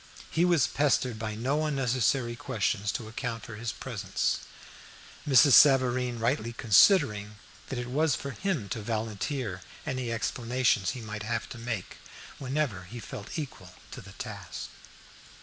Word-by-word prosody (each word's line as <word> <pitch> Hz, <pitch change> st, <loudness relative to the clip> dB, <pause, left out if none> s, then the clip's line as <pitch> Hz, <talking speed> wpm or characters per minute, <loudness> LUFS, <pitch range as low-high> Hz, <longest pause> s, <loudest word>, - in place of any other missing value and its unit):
He 170 Hz, +2 st, +3 dB
was 170 Hz, -6 st, +4 dB
pestered 130 Hz, -5 st, +1 dB
by 110 Hz, -1 st, -3 dB
no 135 Hz, +7 st, 0 dB
unnecessary 130 Hz, -3 st, +1 dB
questions 105 Hz, -5 st, -1 dB
to 110 Hz, -, -4 dB
account 115 Hz, 0 st, -4 dB
for 115 Hz, -, -8 dB
his 115 Hz, 0 st, -3 dB
presence, 100 Hz, -7 st, -2 dB, 0.9 s
Mrs. 135 Hz, +1 st, +7 dB
Savareen 130 Hz, -3 st, +5 dB
rightly 115 Hz, 0 st, 0 dB
considering 105 Hz, -, +4 dB, 0.3 s
that 135 Hz, -, -3 dB
it 125 Hz, -, -3 dB
was 145 Hz, +4 st, +1 dB
for 140 Hz, -, -5 dB
him 170 Hz, -, -2 dB
to 110 Hz, -, -3 dB
volunteer 110 Hz, -1 st, -3 dB, 0.2 s
any 130 Hz, -2 st, -2 dB
explanations 115 Hz, -3 st, +1 dB
he -, -, -7 dB
might 110 Hz, -1 st, -6 dB
have 115 Hz, +1 st, -2 dB
to 120 Hz, -, -8 dB
make 115 Hz, -5 st, -4 dB, 0.4 s
whenever 130 Hz, -, -2 dB
he 120 Hz, +7 st, -8 dB
felt 105 Hz, +2 st, -7 dB
equal 95 Hz, -, -7 dB, 0.2 s
to -, -, -8 dB
the -, -, -13 dB
task. -, -, -7 dB
120 Hz, 145 wpm, -29 LUFS, 110-135 Hz, 0.9 s, Mrs